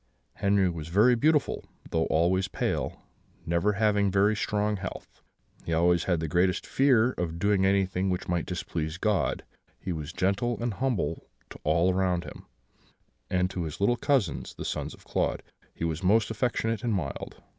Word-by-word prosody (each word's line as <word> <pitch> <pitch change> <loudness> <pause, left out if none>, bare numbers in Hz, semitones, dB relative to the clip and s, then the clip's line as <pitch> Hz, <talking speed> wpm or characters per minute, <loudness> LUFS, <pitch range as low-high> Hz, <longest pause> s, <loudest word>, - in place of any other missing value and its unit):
"Henri 100 -1 +3
was 80 -3 -4
very 105 +9 +5
beautiful, 150 +5 +2 0.3
though 80 0 +1
always 90 +4 +2
pale, - - -2 0.4
never 85 +5 +1
having 105 -1 +2
very 100 +3 +3
strong 105 0 0
health. 95 -1 -8 0.4
He 85 - -3
always 85 +1 +3
had 90 -3 +1
the 80 - -2
greatest 90 +4 +1
fear 130 -3 +3
of 85 -2 -2
doing 100 +1 +2
anything 95 -1 +1
which 90 -1 -2
might 90 -1 -1
displease 80 -3 -3
God; 105 +1 0 0.4
he 95 - -4
was 80 -1 -5
gentle 100 +7 0
and 120 -1 -1
humble 115 - -2 0.2
to - - -10
all 85 +4 +3
around 90 -2 +1
him, - - -11 0.8
and 90 0 +2
to 90 - -3
his 80 -3 -5
little 100 +5 +3
cousins, 120 - 0
the - - -6
sons - - -3
of - - -22
Claude, - - -1 0.3
he - - -7
was 80 -1 -1
most 105 +3 +3
affectionate 115 -1 -1
and 115 -3 +1
mild. 75 -8 -5
95 Hz, 165 wpm, -28 LUFS, 85-105 Hz, 0.8 s, very